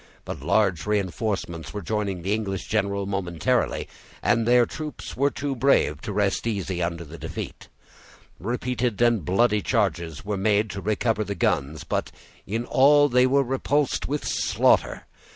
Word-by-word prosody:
But - - -6
large 95 -5 +1
reenforcements 95 -3 -2
were 105 - -4
joining 100 -2 -2
the 100 +3 0
English 100 -4 -2
general 100 -2 0
momentarily, 90 -5 -1 0.4
and 115 -1 +2
their 120 0 +5
troops 155 +5 -7
were 140 +2 +2
too 140 -1 -3
brave 120 - +2
to - - -5
rest 100 +2 0
easy 95 -5 -2
under 85 0 -2
the 80 +3 -11
defeat. - - -7 0.7
Repeated 120 +1 -2
and 120 -5 +3
bloody 105 +5 +2
charges 95 - -1
were 105 -1 -2
made 105 +1 +2
to 100 - -5
recover 110 +1 0
the 100 -1 -4
guns, 75 -2 0
but - - -2 0.4
in 115 +4 -2
all 145 +3 +5
they 125 0 +4
were 140 +1 +3
repulsed 135 +2 0
with 145 +2 -2
slaughter. - - +2
105 Hz, 150 wpm, -25 LUFS, 95-120 Hz, 0.7 s, their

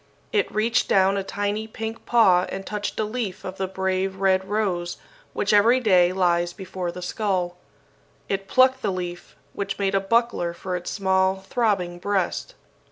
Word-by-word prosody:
It 425 -3 +1
reached 225 +3 +1
down 190 0 +4
a 195 - -1
tiny 205 +2 -2
pink 225 +1 -6
paw 190 -7 +5
and 195 0 -5
touched 210 -1 -4
a - - +2
leaf 215 -3 -4
of 185 0 -6
the 190 - -1
brave 190 0 -1
red 190 -1 +2
rose 190 -5 -1 0.4
which - - 0
every 230 +5 +5
day 185 -7 +4
lies 175 -2 +1
before 185 -2 -5
the 180 +1 -8
skull. 180 -2 -1 0.7
It 195 0 -2
plucked 260 +2 +4
the - - 0
leaf, 175 -1 -6 0.2
which 200 0 -3
made 195 -1 0
a 195 - +3
buckler 195 -4 0
for 185 +1 -4
its 180 0 -4
small 190 -1 +1
throbbing 195 -7 0
breast. 195 -1 -1
195 Hz, 165 wpm, -24 LUFS, 185-215 Hz, 0.7 s, paw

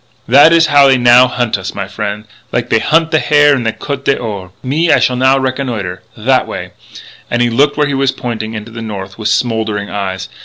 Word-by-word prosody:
"That 140 +6 +6
is 165 0 +5
how 145 -3 +5
they 135 -1 +4
now 120 +1 +5
hunt 120 -5 -2
us, 95 - -7
my 100 -1 -4
frien' 105 +1 -5 0.3
like - - -2
they 110 - +3
hunt 160 +4 +1
the 155 - +3
hare 145 -1 +3
in 130 - -2
the 115 -1 -1
Côte 140 +3 -6
d'Or.... 105 -8 -2
Me, 155 +6 0
I - - +5
shall 125 - +1
now 130 +2 +3
reconnoitre 125 -9 -3 0.2
that - - +1
way!" - - -7 0.6
And 120 - -1
he 120 0 +1
looked 140 +5 +1
where 150 - +2
he 140 - -2
was 135 0 +1
pointing, 115 -3 -5
into 110 +2 -8
the 115 0 -8
north 100 -3 -7
with 110 0 -1
smouldering 110 -3 -1
eyes. 95 -2 -4
120 Hz, 220 wpm, -13 LUFS, 105-140 Hz, 0.6 s, That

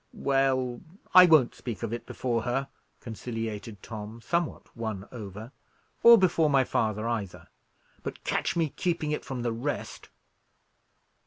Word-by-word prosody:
"Well, 130 -3 +1 0.3
I 185 -1 +10
won't 155 -7 +5
speak 120 -2 -6
of 115 0 -2
it 120 - -5
before 120 -3 -1
her," 135 +4 -2 0.3
conciliated 115 -3 -6
Tom, 110 0 -7
somewhat 170 +8 -3
won 110 -4 -4
over, 110 0 -8 0.5
"or 235 0 +10
before 170 -5 +3
my 135 -2 +4
father, 110 -2 -1
either; 110 -6 -4 0.5
but - - -7
catch - - -1
me 165 -2 +1
keeping 165 0 -2
it 150 - -2
from 125 -3 -5
the 120 -1 0
rest." 130 +6 -4
120 Hz, 140 wpm, -28 LUFS, 110-140 Hz, 0.5 s, I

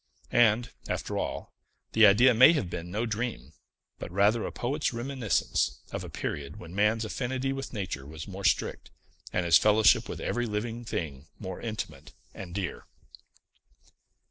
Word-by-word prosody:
And, 115 0 +4 0.2
after - - -3
all, - - -4 0.4
the 110 -1 +8
idea 120 +6 +6
may 130 +8 +8
have 100 - -2
been 85 0 -5
no 105 +6 -1
dream, 105 - -4 0.5
but - - -6
rather 105 +4 +3
a - - -5
poet's 140 +5 -1
reminiscence 115 - -1
of - - -4
a - - -7
period 70 +1 -5
when 85 0 -10
man's 105 +3 +2
affinity 130 +3 -2
with 135 0 -5
nature 90 - -4
was 80 +1 -8
more 100 0 -7
strict, - - 0 0.4
and 90 - 0
his 85 - +7
fellowship 110 +1 +4
with - - -5
every 120 0 -1
living 115 +3 -3
thing 75 -8 -4
more 95 -3 -7
intimate 110 -2 -6 0.2
and 90 -2 -8
dear. 100 -3 -4
105 Hz, 155 wpm, -28 LUFS, 90-120 Hz, 0.5 s, the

